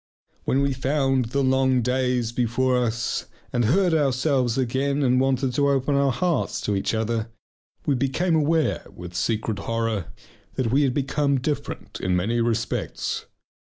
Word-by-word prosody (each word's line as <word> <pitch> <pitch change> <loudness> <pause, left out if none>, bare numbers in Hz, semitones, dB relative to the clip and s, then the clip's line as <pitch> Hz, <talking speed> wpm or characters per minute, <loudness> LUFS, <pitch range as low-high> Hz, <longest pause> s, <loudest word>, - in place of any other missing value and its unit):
When 135 +2 +2
we 140 -1 +1
found 135 -1 +1
the 140 +5 -1
long 130 -1 +3
days 125 -1 0
before 125 +2 +1
us 120 -1 -1 0.3
and 120 -1 +2
heard 175 - +3
ourselves 135 -4 +1
again 135 +3 0
and 130 0 +3
wanted 135 -1 +1
to 140 +2 +2
open 140 +1 +1
our 140 -1 +3
hearts 175 +5 0
to 105 - -1
each 95 +3 -1
other, 110 0 -1 0.6
we 145 - +2
became 140 +7 +1
aware 160 +1 +1
with 90 0 -9
secret 110 +2 -1
horror 115 -3 -2 0.5
that 120 -4 0
we 140 +3 +4
had 135 -3 +1
become 140 0 +1
different 145 +3 -4
in 90 -1 +1
many 115 +7 +1
respects. 115 -1 -2
130 Hz, 155 wpm, -24 LUFS, 115-140 Hz, 0.6 s, we